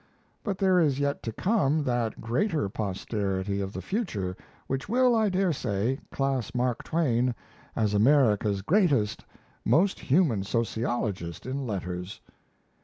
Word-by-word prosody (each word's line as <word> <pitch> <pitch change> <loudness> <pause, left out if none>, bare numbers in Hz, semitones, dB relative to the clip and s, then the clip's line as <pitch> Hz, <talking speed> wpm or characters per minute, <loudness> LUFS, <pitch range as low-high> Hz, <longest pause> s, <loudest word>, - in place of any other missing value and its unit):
But 200 -3 -2
there 190 -2 +4
is 145 -5 +2
yet 140 0 0
to 115 - -4
come 160 - +1
that 120 -4 -1
greater 150 - 0
posterity 100 -1 -2
of 95 0 -3
the - - -6
future 110 - -2 0.3
which 135 +6 -3
will, 250 +1 +4
I 220 -2 +3
dare 185 -2 +1
say, 120 +1 -1
class 135 -4 -1
Mark 125 -1 0
Twain 125 -7 +1 0.4
as 105 -2 +1
America's 105 -4 +3
greatest, 145 - +2 0.4
most 190 +5 +3
human 140 - +2
sociologist 110 -5 -2
in 130 +1 -3
letters. 90 -1 -4
125 Hz, 130 wpm, -27 LUFS, 105-160 Hz, 0.4 s, there